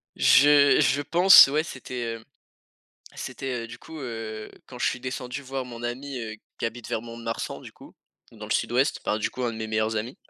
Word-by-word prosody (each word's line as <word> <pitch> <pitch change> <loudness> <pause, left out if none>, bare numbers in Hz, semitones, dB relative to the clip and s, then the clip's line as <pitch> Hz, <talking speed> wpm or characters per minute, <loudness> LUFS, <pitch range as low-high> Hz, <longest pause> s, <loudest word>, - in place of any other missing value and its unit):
je 145 0 +6
je 140 +2 +2
pense, 175 +4 +8
ouais, 150 +3 0
c'était, 125 -5 -6
hem, 115 - -12 0.9
c'était, 125 -2 -5
heu, - - -7
du 115 - -11
coup, 160 0 -11
heu, 110 -4 -6 0.2
quand 125 - -11
je - - 0
suis - - -3
descendu 130 +1 -5
voir 135 0 -5
mon 120 -1 -9
ami, 130 +3 -5
heu, 110 -2 -6 0.2
qui - - -4
habite 115 +1 -5
vers 110 - -2
Mont‑de‑Marsan, 115 -1 -6
du - - -11
coup, - - -16 0.4
dans - - -10
le - - -12
sud-ouest, - - 0
par, 105 - 0
du 105 - -1
coup, 130 - -6
1 120 - -1
de 110 - -8
mes 110 - -4
meilleurs 110 0 -1
amis. 115 +5 -4
120 Hz, 210 wpm, -25 LUFS, 115-135 Hz, 0.9 s, pense